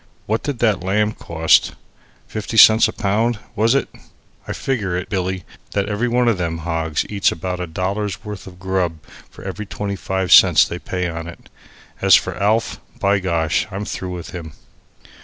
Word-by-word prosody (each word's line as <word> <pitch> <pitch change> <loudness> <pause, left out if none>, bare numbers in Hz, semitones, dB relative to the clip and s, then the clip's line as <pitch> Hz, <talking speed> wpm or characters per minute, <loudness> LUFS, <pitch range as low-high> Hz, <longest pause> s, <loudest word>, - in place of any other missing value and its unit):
What 110 +2 -1
did 145 -3 -3
that 105 -5 +1
lamb 105 +3 +1
cost? 80 -5 +2 0.5
Fifty 110 +1 -5
cents 110 +1 +8
a - - -3
pound, 110 +4 0 0.2
was 115 +4 +3
it? 140 - +1 0.6
I - - -4
figure 105 -10 -2
it, 90 - -5
Billy, 95 -2 -2 0.3
that 100 -1 0
every 105 +3 -1
one 120 0 +2
of 110 -6 +2
them 85 -2 -2
hogs 80 -2 -1
eats 100 -2 +1
about 90 +2 -4
a 90 - -3
dollar's 100 +5 -3
worth 105 -2 -7
a - - -8
grub 90 -2 -2 0.3
for - - -14
every 100 +2 -6
twenty 100 0 -4
five 95 -1 -2
cents - - +7
they - - -5
pay 90 -1 -3
on 85 0 -5
it. 85 - -12 0.5
As - - +7
for - - 0
Alf 110 +3 +1 0.2
by 100 0 +2
gosh, 85 -2 0
I'm 100 +1 -5
through 95 - -5
with 85 - -8
him." 80 -4 -8
95 Hz, 180 wpm, -20 LUFS, 90-105 Hz, 0.6 s, cents